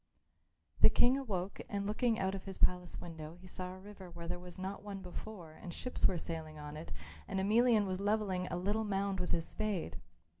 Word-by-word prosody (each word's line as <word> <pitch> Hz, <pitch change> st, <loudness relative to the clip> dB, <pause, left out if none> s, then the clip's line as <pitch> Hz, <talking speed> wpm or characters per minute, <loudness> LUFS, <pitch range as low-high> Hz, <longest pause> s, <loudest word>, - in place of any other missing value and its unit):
The -, -, +9 dB
King 250 Hz, +2 st, +6 dB
awoke 200 Hz, -9 st, -2 dB
and 200 Hz, -1 st, -1 dB
looking 225 Hz, +2 st, +2 dB
out 190 Hz, -1 st, +1 dB
of 195 Hz, -1 st, -4 dB
his 195 Hz, -1 st, -4 dB
palace 180 Hz, -1 st, +3 dB
window 160 Hz, -1 st, -7 dB
he 185 Hz, -, -13 dB
saw 180 Hz, 0 st, -4 dB
a 185 Hz, -, -8 dB
river 195 Hz, -1 st, -10 dB
where 170 Hz, 0 st, -7 dB
there 175 Hz, +1 st, -2 dB
was 180 Hz, 0 st, -9 dB
not 190 Hz, +2 st, -3 dB
one 200 Hz, -2 st, -6 dB
before 180 Hz, -2 st, -7 dB
and 175 Hz, +2 st, -8 dB
ships 250 Hz, +8 st, +2 dB
were 180 Hz, -, 0 dB
sailing 160 Hz, -2 st, -4 dB
on 150 Hz, 0 st, -6 dB
it 155 Hz, +2 st, -7 dB, 0.4 s
and 190 Hz, -, 0 dB
Emelian 220 Hz, +2 st, +5 dB
was 185 Hz, -1 st, -1 dB
levelling 200 Hz, -3 st, +1 dB
a -, -, -1 dB
little 205 Hz, +5 st, +1 dB
mound 195 Hz, -2 st, 0 dB
with 180 Hz, -, -1 dB
his 165 Hz, -1 st, +1 dB
spade. 195 Hz, -, -1 dB
190 Hz, 210 wpm, -35 LUFS, 175-205 Hz, 0.4 s, The